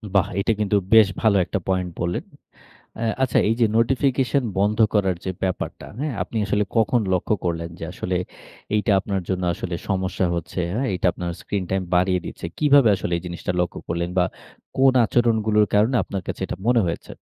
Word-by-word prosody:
বাহ! 95 - +4
এটা 105 - +1
কিন্তু 105 -1 +1 0.2
বেশ 110 -2 +8
ভালো 105 -3 +4
একটা 95 - -2
পয়েন্ট 95 -1 0
বললেন। 85 0 -1 0.8
আ - - 0 0.2
আচ্ছা 130 -3 +2
এইযে 115 +1 +3
নোটিফিকেশন 135 +3 +2 0.2
বন্ধ 105 +2 +1 0.2
করার 95 -3 +2
যে 95 - -1
ব্যাপারটা, 95 -1 -3
হ্যাঁ? 150 -3 -2
আপনি 100 +5 -7
আসলে 105 0 +1
কখন 115 +2 +3
লক্ষ্য 90 +4 +1
করলেন 85 -1 -2
যে - - -5
আসলে 90 0 -2 0.6
এইটা 105 +1 +1
আপনার 95 -1 -3
জন্য 95 -1 -1
আসলে 85 -1 -5
সমস্যা 95 -1 0
হচ্ছে, 85 +1 -4
হ্যাঁ? 130 +4 0
এটা 90 0 -1
আপনার 90 0 -4
স্ক্রিন 100 +2 -3
টাইম 95 0 0
বাড়িয়ে 90 +1 +2
দিচ্ছে? - - -6
কিভাবে 145 -5 +5
আসলে 85 - -4
এই 85 - -5
জিনিসটা 85 +1 -4
লক্ষ্য 90 - -2
করলেন 85 +1 -2
বা 90 - +5 0.5
কোন 135 0 +5
আচরণগুলোর 110 -3 +2
কারণে 110 +5 +3
আপনার 95 0 -5
কাছে - - -5
এটা - - -5
মনে 120 -1 +4
হয়েছে? 85 - -4
100 Hz, 180 wpm, -23 LUFS, 90-115 Hz, 0.8 s, বেশ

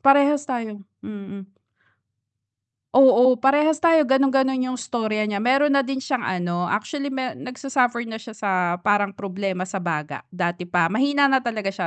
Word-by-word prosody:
parehas 280 +1 +4
tayo, 225 -6 -5 0.2
mm. 200 -2 -9 1.4
Oo, 255 -1 +6
parehas 295 +4 +3
tayo 330 -2 +4
gano'n-gano'n 265 -1 +1
yung 255 - -3
istorya 225 -3 -2
niya. 210 -1 -2
Mayro'n 270 +7 +2
na 275 - 0
din 265 0 -4
siyang 260 -3 -3
ano, 175 -1 -2
actually 275 - -3
me 265 -2 -4
nagsa-suffer 250 -2 -1
na 225 -1 -7
siya 225 0 -12
sa 205 -3 -3 0.3
parang 205 0 +1
problema 195 -1 -4
sa 190 +1 -4
baga, 150 -5 -5
dati 175 0 -3
pa. 175 -1 +1
Mahina 280 +4 +2
na 265 - +4
talaga 220 -5 -3
siya 195 - -4
235 Hz, 155 wpm, -22 LUFS, 200-270 Hz, 1.4 s, Oo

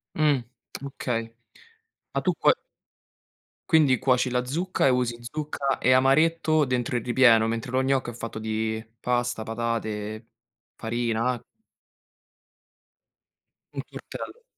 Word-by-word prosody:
Mh. 150 -4 +3 0.4
Okay, 115 -4 -3 0.8
ma - - 0
tu - - +2
cuo - - +6 1.2
quindi 150 -7 +5
cuoci 130 -1 +2
la 125 0 +1
zucca, 165 +2 0
e - - +5
usi 125 -2 +1
zucca 140 +1 -2
e 130 - +2
amaretto 155 +4 +4
dentro 125 -2 -1
il 120 - -1
ripieno, 120 -3 +5
mentre 115 +2 -2
lo 130 +1 +1
gnocco 130 -2 +1
è - - -6
fatto 115 -1 -6
di 110 0 -2 0.2
pasta, 120 -2 -1
patate, 110 -1 -3 0.5
farina 115 +1 0
a 120 - -6 2.3
Un - - -3
tortello. 485 - -9
125 Hz, 120 wpm, -26 LUFS, 115-135 Hz, 2.3 s, cuo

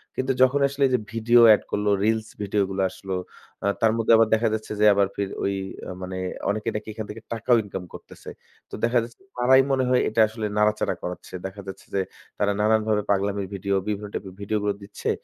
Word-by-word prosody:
কিন্তু 130 +1 0
যখনই 140 +2 +4
আসলে 140 +1 -1
এইযে 125 -2 +1
video 115 +1 +4
add 105 - +2
করলো, 105 0 0
reels 110 0 +1
video 100 0 0
গুলা 95 0 -1
আসলো, 95 0 -5 0.5
আ - - +2
তার 115 -1 +4
মধ্যে 115 0 +2
আবার 115 0 +5
দেখা 110 +1 +3
যাচ্ছে 110 0 -4
যে 105 - +4
আবার 100 -1 +3
ফে 100 - -1 0.2
ওই 100 - 0 0.4
আ - - -4
মানে 95 0 -5 0.3
অনেকে 110 +2 -1
নাকি 105 +1 -4
এখান 110 0 -5
থেকে 110 +2 -8
টাকাও 115 +2 +2
income 95 -3 -7
করতেছে। - - -11 0.4
তো - - -24
দেখা 120 +1 +3
যাচ্ছে 115 +6 -12 0.2
তারাই 130 +2 +6
মনে 130 -1 +2
হয় 125 0 +4
এটা 110 +1 +2
আসলে 110 0 -5
নাড়াচাড়া 105 0 +2
করাচ্ছে। 90 0 -7
দেখা 95 +1 -6
যাচ্ছে 95 - -8
যে 100 - +2 0.4
তারা 100 0 +2
নানানভাবে 110 -1 +2
পাগলামি 100 0 0
video, 100 +1 -2
বিভিন্ন 105 0 -3
type-এর 95 -2 -6
video 105 +2 -1
গুলো 105 -1 +1
দিচ্ছে 100 +1 -5
105 Hz, 205 wpm, -24 LUFS, 100-115 Hz, 0.5 s, তারাই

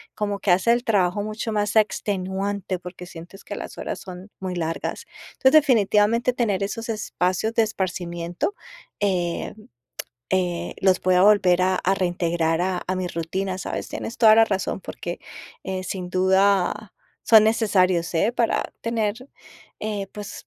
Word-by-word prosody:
como 205 -1 -2
que 195 - +1
hace 185 +6 +4
el 240 0 0
trabajo 205 -4 +1
mucho 215 +2 -4
más 210 0 -1
extenuante, 195 -2 -1
porque 180 0 -9
sientes 175 +3 -12
que - - -6
las - - -8
horas - - -4
son 185 +1 -10
muy 185 -1 -4
largas. 165 -1 -3 0.3
Entonces, 265 - +3
definitivamente, 230 -2 +2
tener 215 -6 0
esos 225 +3 -4
espacios 210 -1 -1
de 230 - +4
esparcimiento, 175 - -3 0.5
em, 180 -4 -1 0.8
eh, 175 -2 -1
los 190 -1 +3
pueda 180 0 +3
volver 190 -3 +5
a 185 0 +2
a 190 +1 +1
reintegrar 170 -3 0
a 185 0 -1
a 185 - -1
mi 185 -1 -2
rutina, 185 +3 -3
¿sabes? - - -4
Tienes 230 - -6
toda 220 -2 +7
la 225 - +7
razón, 195 -2 -2
porque, 175 -1 -6 0.5
eh, 190 -1 -3
sin 185 -1 -5
duda 190 +2 +2 0.3
son 220 -2 +7
necesarios, 185 -6 +2
¿eh? 200 +8 +2
para 235 -1 0
tener, 230 +1 -2 0.5
eh, 205 -2 -3
pues, 205 -1 -8
190 Hz, 150 wpm, -23 LUFS, 180-215 Hz, 0.8 s, toda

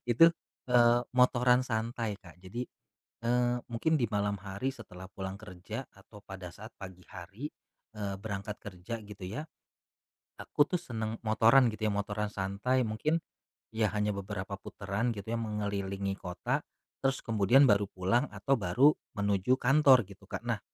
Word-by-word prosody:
Itu, 120 +8 +7 0.4
eee, 120 0 +6
motoran 125 0 +4
santai 115 -1 -2
Kak. 90 -3 -15
Jadi, 95 +7 -5 0.6
eee, 120 0 +2 0.2
mungkin 160 +7 +2
di 130 - +1
malam 100 0 +1
hari 100 +6 -4
setelah 95 -8 -8
pulang 95 +1 -6
kerja 90 -5 -7
atau 105 - -16
pada 95 -3 -9
saat 110 +5 -12
pagi 95 -2 -9
hari, 100 +9 -7 0.5
eee, 100 -2 -3
berangkat 105 0 -5
kerja 100 +3 -6
gitu 105 -3 -10
ya. 150 - -5 0.9
Aku 145 - +2
tuh 175 +2 -2
senang 110 -5 -4
motoran 115 +3 +5
gitu 110 0 -3
ya. 105 - +2
Motoran 105 +1 -2
santai 100 +7 0
mungkin, 150 +10 0 0.5
iya 110 -1 +2
hanya 105 0 +1
beberapa 100 0 -5
putaran 100 +5 -2
gitu 105 +3 -5
ya, 115 - 0
mengelilingi 100 -3 -2
kota, 90 -1 -2 0.4
terus 135 0 0
kemudian 115 +5 +5
baru 100 -4 +4
pulang 100 +9 +1
atau 135 - 0
baru 125 +11 +5 0.2
menuju 100 +4 +2
kantor 135 -3 +6
gitu 100 -1 -15
Kak. - - -5
Nah - - -1
105 Hz, 150 wpm, -31 LUFS, 100-120 Hz, 0.9 s, Itu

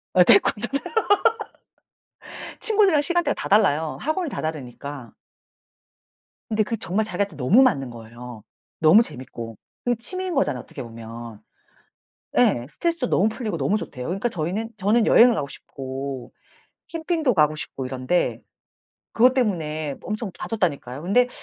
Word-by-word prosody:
예 180 - +8
태권도. 210 +2 +4 1.9
친구들이랑 405 -8 +4
시간대가 345 +3 +1
다 - - -4
달라요, 160 -7 +3
학원이 315 +3 -1
다 - - -4
다르니까. 140 -4 -6 1.4
근데 215 0 +2
그게 230 +2 -3
정말 200 +3 -1
자기한테 200 -3 -2
너무 150 - +4
맞는 160 - +2
거예요. 120 -1 -10 0.4
너무 165 +7 +7
재밌고. 120 - -6 0.3
그게 245 0 +1
취미인 370 +10 -2
거잖아요, 145 - 0
어떻게 135 - -9
보면. 115 -1 -9 1.0
예. 120 - +3
스트레스도 335 - -1
너무 205 +4 +3
풀리고 220 -5 -4
너무 150 +9 +1
좋대요. 125 -11 -6
그러니까 195 +7 -1
저희는 185 +5 -3
저는 215 +3 +3
여행을 240 +1 +7
가고 145 -10 -2
싶고 135 -1 -7 0.6
캠핑도 320 -5 0
가고 155 -3 +3
싶고 135 -3 -6
이런데 130 +7 -1 0.7
그것 250 +3 +5
때문에 155 - -1
엄청 215 -1 -4
다퉜다니까요. 145 - -2
근데 245 +8 +3
180 Hz, 330 characters per minute, -23 LUFS, -, 1.9 s, 예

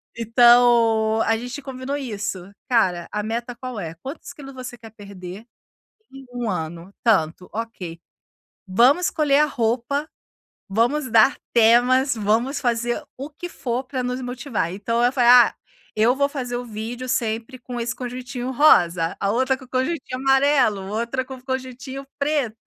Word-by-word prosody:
Então, 230 -1 +4
a 225 - +2
gente 245 +4 -6
combinou 265 +1 -5
isso, 205 -7 -5 0.2
cara, 185 -8 +2
a 210 0 -2
meta 235 +2 -4
qual 250 -2 -6
é? 165 -2 -6
Quantos 270 - -9
quilos 275 -2 -11
você 250 -1 -8
quer 225 -1 -13
perder 200 -1 -10 0.7
em 270 0 -12
1 180 -5 -4
Tantos, 180 -6 +1
ok! 195 -7 -6 0.7
Vamos 255 - +4
escolher 290 -3 +2
a 300 - +5
roupa, 250 +3 -1 0.6
vamos 245 +7 +1
dar 230 +6 +4 0.2
temas, 245 +3 +4
vamos 225 +6 0
fazer 240 +1 0 0.2
o 275 +4 -7
que 350 +4 -8
for 250 -4 -3
para 255 -1 -4
nos 250 +1 -3
motivar. 245 - -3
Então, 230 +5 -2
eu 245 - +3
fa 255 - +1 0.2
"Ah, - - -6 0.4
eu 225 +4 +3
vou 280 0 +2
fazer 255 -4 -4
o 245 - -4
vídeo 235 +3 -6
sempre 230 +1 -2
com 245 0 -6
esse 240 +1 -2
conjuntinho 250 0 -5
rosa", 175 - +4
a 200 - +1
outra 260 +3 +1
com 260 - -14
conjuntinho 260 0 -2
amarelo, 270 -7 +3
outra 235 +5 -2
com 265 - -9
o 250 - -18
conjuntinho 260 +1 -5
preto. 280 -6 -1
245 Hz, 155 wpm, -22 LUFS, 220-260 Hz, 0.7 s, a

